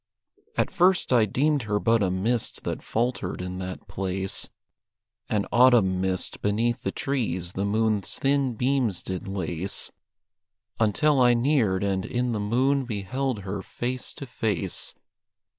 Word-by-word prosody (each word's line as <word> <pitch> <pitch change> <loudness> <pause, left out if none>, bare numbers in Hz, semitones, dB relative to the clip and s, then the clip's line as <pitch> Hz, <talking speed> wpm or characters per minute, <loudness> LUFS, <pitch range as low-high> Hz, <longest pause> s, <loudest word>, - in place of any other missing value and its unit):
At - - +1
first 180 -5 +3
I 115 -3 +5
deemed 145 +7 +1
her 105 -1 +2
but 115 0 +3
a 95 - +2
mist 105 +6 -1
that - - -3
faltered 115 -5 -2
in 90 0 -5
that 95 0 -6
place, 95 0 -1 0.8
An 105 -2 +1
autumn 120 -7 +5
mist 95 -1 -2
beneath 115 +3 +1
the - - -2
trees 95 -10 -2
the 100 - -1
moon's 105 -1 0
thin 135 -3 +1
beams 125 -5 +1
did 95 +3 -5
lace, 95 -1 -2 0.9
Until 130 +6 +3
I 120 -1 +6
neared 120 -7 +2
and 95 -2 0
in 125 +3 -1
the 110 - -1
moon 130 +7 +2
beheld 120 +2 -2
her 100 +1 -4
face 125 +5 -4
to 140 - -7
face. 115 -4 -2
110 Hz, 140 wpm, -26 LUFS, 95-125 Hz, 0.9 s, I